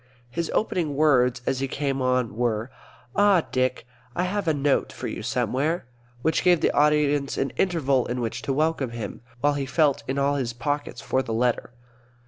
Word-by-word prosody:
His 170 +4 -2
opening 170 -9 0
words, 125 -5 +3
as 135 -1 0
he 135 - -1
came 135 0 -2
on, 125 -4 +1
were, 115 0 -1 0.4
"Ah, 200 -4 +4
Dick, 130 -2 0 0.3
I 180 - +1
have 195 0 -2
a - - +5
note 145 -1 +1
for - - -6
you - - -5
somewhere," 150 +6 -1 0.4
which 160 - +1
gave 175 -2 +5
the - - +2
audience 145 -1 +2
an 135 - 0
interval 140 -9 +1
in 125 +1 -2
which 120 0 -3
to 135 - -2
welcome 150 -2 +1
him, 115 -4 -6 0.2
while 145 +1 +3
he 140 -1 -2
felt 145 0 +2
in 130 - -2
all 140 +1 +2
his 120 -3 -2
pockets 135 0 -3
for 130 - 0
the 115 -4 -3
letter. 120 0 0
140 Hz, 185 wpm, -25 LUFS, 125-155 Hz, 0.4 s, a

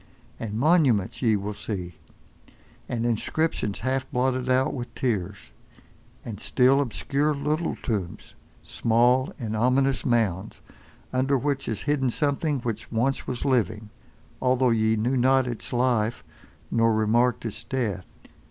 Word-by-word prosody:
And 105 -2 -4
monuments 135 - +2
ye 115 -4 +3
will 105 +1 -3
see, 90 -4 -5 1.0
and 120 -1 -1
inscriptions 120 -1 -1
half 130 +1 -1
blotted 130 0 0
out 130 +1 +2
with 125 -2 -6
tears; 105 -6 -2 0.7
and 110 -4 -6
still, 130 +4 +3
obscure, 145 +4 -1
little 150 +4 -1
tombs; 100 -8 -4 0.3
small 120 +3 +2
and 110 -3 -4
ominous 130 +4 +2
mounds, 110 -7 0 0.5
under 135 +2 +2
which 140 +1 -2
is 110 - -3
hidden 145 -3 +1
something 145 +2 0
which 115 -1 -4
once 120 +4 0
was 125 -2 -3
living, 110 -5 0 0.5
although 130 -1 +3
ye 110 -1 +2
knew 120 +5 0
not 130 +1 +4
its 120 -3 -6
life, 120 -3 +1 0.5
nor 115 -1 +3
remarked 120 +3 +2
its 110 - -5
death. 110 -8 -3
120 Hz, 130 wpm, -25 LUFS, 110-130 Hz, 1.0 s, not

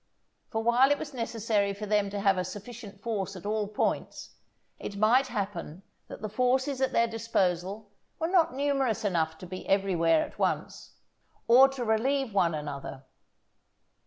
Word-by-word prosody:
For 220 0 -2
while 240 +3 +5
it 290 - +3
was 290 - -7
necessary 220 -4 -1
for 210 +1 -6
them 205 -1 +1
to 200 0 -4
have 195 -1 +4
a - - 0
sufficient 205 +2 -9
force 200 -4 -3
at 185 - -10
all 210 0 -1
points, 210 - -2 0.5
it 200 - -6
might 240 +6 +4
happen 195 -6 -5 0.2
that - - -10
the - - -1
forces 255 +4 0
at 265 - +2
their 235 - +3
disposal 205 -3 -1 0.3
were 320 - -2
not 340 -7 +3
numerous 275 -5 0
enough 160 -4 0
to 180 - -10
be 185 +1 -8
everywhere 175 -5 +3
at - - -15
once, - - -2 0.5
or 255 +3 +8
to 265 -3 -4
relieve 245 +2 +1
one 175 -5 +2
another. 140 -2 -6
215 Hz, 160 wpm, -28 LUFS, 195-245 Hz, 0.5 s, or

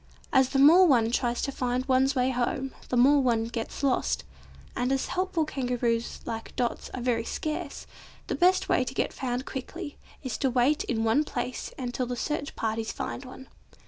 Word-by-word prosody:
As 265 -2 +5
the - - -1
more 330 +7 +8
one 235 -6 +4
tries 240 0 0
to 275 - -1
find 250 -1 -1
one's 265 +1 +3
way 255 0 +2
home, 260 +2 -1 0.2
the 250 - 0
more 280 +4 +6
one 235 -3 +2
gets 230 +4 -5
lost, 270 -2 +1 0.5
and 250 +1 0
as 270 -1 0
helpful 365 -3 0
Kangaroos 245 -4 -1
like 225 -1 -6
Dot's 240 -2 -2
are 255 - -4
very 240 -2 +1
scarce, 310 +5 -4 0.4
the - - -3
best 365 +1 +3
way - - +3
to 255 +1 -6
get - - 0
found 255 0 -3
quickly, 290 +4 -6 0.2
is 260 -4 -4
to 270 - +2
wait 255 +4 +2
in 225 -2 -1
one 225 +7 +3
place 250 -4 -4
until 250 -1 -3
the 245 - -3
search 290 +3 -3
parties 220 0 -2
find 260 - -5
one. 260 +1 -11
255 Hz, 185 wpm, -27 LUFS, 240-280 Hz, 0.5 s, more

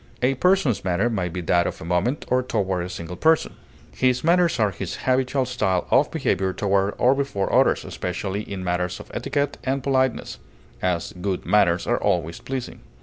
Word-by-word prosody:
A 130 +2 +4
person's 180 - +2
manner 95 +6 +1
may 95 -5 -1
be 90 +2 -4
that 85 +1 +2
of - - -5
a - - -8
moment, 90 - 0
or 130 0 +2
toward 100 -8 -1
a - - -7
single 85 0 -6
person; 160 - +2 0.4
his 130 -1 +1
manners 170 -4 +3
are 105 -2 +3
his 95 0 -5
habitual 130 +1 +1
style 105 -8 0
of - - +4
behavior 95 +1 0
toward 100 0 +1
or 125 +2 +4
before 135 -8 -2
others, - - +3
especially 95 +3 -3
in 100 -3 -6
matters 90 0 -1
of - - -12
etiquette 145 0 -2
and 135 0 -1
politeness; 130 -2 0 0.4
as, 90 -2 -1
good 95 -1 -2
manners 95 -5 +3
are - - 0
always 85 -1 0
pleasing. 130 -2 -5
100 Hz, 180 wpm, -23 LUFS, 90-130 Hz, 0.4 s, A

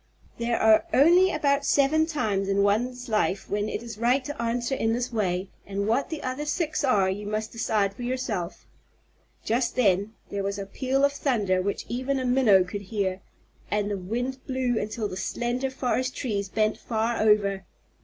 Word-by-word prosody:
There 235 0 0
are 220 +7 +5
only 350 +7 +6
about 280 -2 +1
seven 295 +3 +3
times 210 -11 -1
in 200 0 +2
one's 245 +5 0
life 195 -3 0
when 205 +1 0
it 220 - -4
is 230 -3 -8
right 250 +3 +2
to 290 -3 -5
answer 240 +2 -1
in 225 -4 +1
this 245 +1 -2
way, 190 -3 -1
and 200 +1 -3
what 235 +5 +1
the 320 -2 -5
other 255 +3 -3
six 300 0 -1
are 205 -8 +3
you 205 +2 -3
must 215 +1 -3
decide 215 -4 0
for 225 - -11
yourself. 240 -8 -3 0.8
Just 235 +2 0
then 205 -2 +2
there 200 - -3
was 200 +1 -2
a 200 - -4
peal 265 +7 +1
of 280 - +1
thunder 210 -10 +1
which 200 +2 -3
even 260 +3 -1
a 255 - -2
Minnow 245 -7 +5
could 200 +3 -6
hear, 195 -2 -2 0.5
and 205 0 0
the - - 0
wind 245 +8 -3
blew 255 -3 0
until 215 +1 -3
the 185 - -6
slender 240 +6 -2
forest 255 0 -1
trees 200 -6 -2
bent 215 +1 0
far 225 0 -1
over. 200 -3 +3
225 Hz, 185 wpm, -26 LUFS, 200-255 Hz, 0.8 s, only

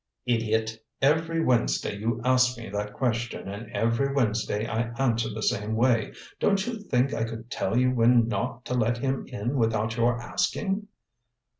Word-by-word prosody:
"Idiot! 110 -2 0 0.2
Every 160 +4 +2
Wednesday 110 - +1
you 110 +3 -2
ask 125 0 +3
me 115 -3 -8
that 105 +1 -3
question, 120 -4 -2
and 105 +3 -7
every 115 +6 +1
Wednesday 110 -5 0
I 115 +1 -2
answer 115 -4 +1
the 110 0 -5
same 105 +2 0
way. 115 -1 +2 0.3
Don't 195 -1 +2
you 240 -2 -4
think 135 -8 +1
I 115 - -1
could 115 +1 -6
tell 105 +5 -1
you 125 0 +4
when 120 -1 +4
not 120 +2 -3
to - - -3
let 120 -1 +1
him 135 +2 -2
in 125 +1 -3
without 110 -1 0
your 120 0 +2
asking?" 195 - -1
115 Hz, 165 wpm, -27 LUFS, 110-130 Hz, 0.3 s, you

